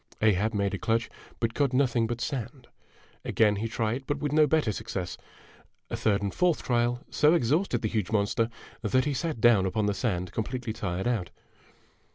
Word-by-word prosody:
Ahab 110 +1 +2
made 100 -1 0
a 100 - -2
clutch, 115 0 0 0.3
but 115 -1 0
caught 140 -1 +1
nothing 125 -3 +2
but 120 0 -3
sand. 125 -2 -4 0.6
Again 105 -2 +2
he 110 +3 -2
tried, 115 +3 -2
but 145 - 0
with 145 -2 -2
no 155 0 +5
better 150 -6 +2
success. 100 -4 -4 0.8
A - - -1
third 100 -2 +1
and 100 - -2
fourth 180 -3 +1
trial 120 +1 0
so 150 +3 +4
exhausted 140 - +1
the - - +2
huge 105 -4 -2
monster 110 +2 +1 0.3
that 130 +5 +2
he 145 - 0
sat 155 -2 -2
down 110 -4 +5
upon 105 +2 0
the 105 - +1
sand 90 -4 -2
completely 120 +1 -3
tired 90 -1 -3
out. 110 -8 -1
115 Hz, 185 wpm, -28 LUFS, 105-130 Hz, 0.8 s, no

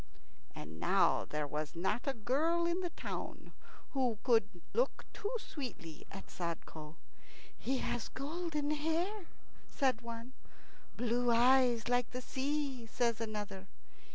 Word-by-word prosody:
And 80 +1 -7
now - - +4
there 150 0 -1
was 150 +3 -3
not 210 - 0
a 275 - +1
girl 300 +10 +2
in 345 +1 +2
the 355 - -1
town - - -5 0.4
who 255 -5 +1
could 225 -8 +3
look - - +1
too 415 - -2
sweetly 245 - -7
at 195 - -7
Sadko. 165 -2 -5 0.6
"He 265 +2 0
has 240 - -1
golden 300 +1 -2
hair," 335 +6 0 0.4
says 265 -5 +2
one. 235 +2 -6 0.6
"Blue 245 +1 +2
eyes 245 0 +5
like 245 0 +3
the 250 - -4
sea," 270 -2 -1
says 235 -1 +1
another. 205 -3 -4
245 Hz, 125 wpm, -35 LUFS, 215-295 Hz, 0.6 s, eyes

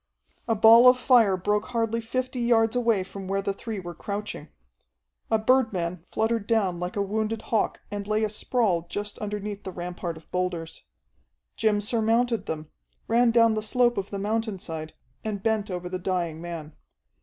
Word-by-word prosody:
A 225 - +2
ball 230 +3 +8
of 250 0 +7
fire 235 -6 +4
broke 210 +3 0
hardly 230 -2 -1
fifty 255 +2 -3
yards 230 -1 +3
away 230 -5 +2
from 195 0 -8
where 195 +1 -1
the 200 - -1
three 220 +1 -5
were 175 -2 -7
crouching. 200 -5 -5 0.8
A 220 - +4
birdman 215 -8 +1
fluttered 220 -1 0
down 200 -7 +1
like 180 0 -4
a 200 - +1
wounded 220 +2 -2
hawk 220 - 0
and 205 -1 -4
lay 215 +1 +1
a 215 - +1
sprawl 210 -6 0
just 205 +2 -4
underneath 210 -1 -4
the 190 - -5
rampart 175 -1 -5
of 160 - -17
boulders. 175 -3 -3 0.7
Jim 215 -2 +2
surmounted 230 +2 +1
them, 155 -1 -5 0.4
ran 235 +1 +4
down 230 -1 +5
the 215 - -1
slope 240 +2 +2
of 195 0 -3
the 200 - -4
mountainside, 195 -7 -3 0.3
and 205 -3 -4
bent 220 -2 0
over 180 -1 -4
the 185 +1 -4
dying 175 -3 -2
man. 165 -3 -7
210 Hz, 170 wpm, -26 LUFS, 185-225 Hz, 0.8 s, ball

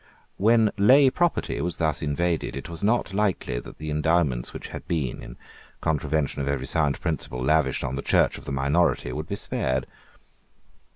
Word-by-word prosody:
When 110 +1 +4
lay 130 +6 +6
property 175 +4 0
was 85 +1 -2
thus 80 -3 0
invaded, 80 +1 -1
it 70 - -6
was 85 +1 -7
not 110 -2 +1
likely 100 -11 0
that - - -11
the 75 0 -5
endowments 75 -5 +1
which - - -8
had - - -8
been, 80 -8 -2
in - - -10 0.4
contravention 75 -1 -1
of 70 - -3
every 70 -2 -1
sound 75 -1 0
principle, 75 -6 -3
lavished 75 -1 +2
on 65 - -2
the - - -2
Church - - +2
of - - -15
the - - -5
minority 70 0 +1
would 75 +5 -5
be 100 - -3
spared. 65 -8 -1
80 Hz, 175 wpm, -25 LUFS, 70-90 Hz, 0.4 s, lay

